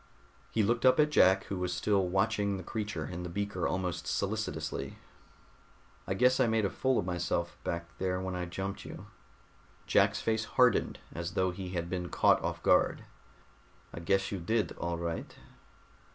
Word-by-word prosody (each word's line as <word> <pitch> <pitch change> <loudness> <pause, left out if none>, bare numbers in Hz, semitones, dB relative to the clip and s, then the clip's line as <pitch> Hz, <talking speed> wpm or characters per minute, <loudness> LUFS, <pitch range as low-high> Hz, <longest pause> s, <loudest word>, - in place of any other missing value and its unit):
He 110 - +1
looked 120 +3 +1
up 130 +2 +5
at 150 0 +4
Jack 95 -8 +5
who 95 - -5
was 90 0 -1
still 95 +1 +1
watching 100 +1 +1
the 95 - -7
creature 105 -6 -3
in 90 +3 -6
the 90 - -5
beaker 100 0 -2
almost 90 -2 -2
solicitously. - - -2 1.1
"I 95 - -1
guess 125 +5 +4
I 130 - +4
made 110 -2 +2
a - - -1
fool 130 -2 +1
of - - 0
myself 85 -1 -1
back 85 0 -4
there 90 -1 0
when 95 0 -3
I 90 -1 -2
jumped 95 +3 -5
you." - - -9 0.8
Jack's - - +3
face 110 0 0
hardened, - - +3 0.2
as 85 +1 -5
though 95 0 +2
he 90 0 -6
had 85 -1 -2
been 90 -1 -3
caught - - +4
off - - -3
guard. - - +3 0.9
"I - - -6
guess 95 +3 +1
you 100 - -3
did, 105 +2 0
all 85 0 -3
right." 85 -1 -4
95 Hz, 175 wpm, -31 LUFS, 90-105 Hz, 1.1 s, up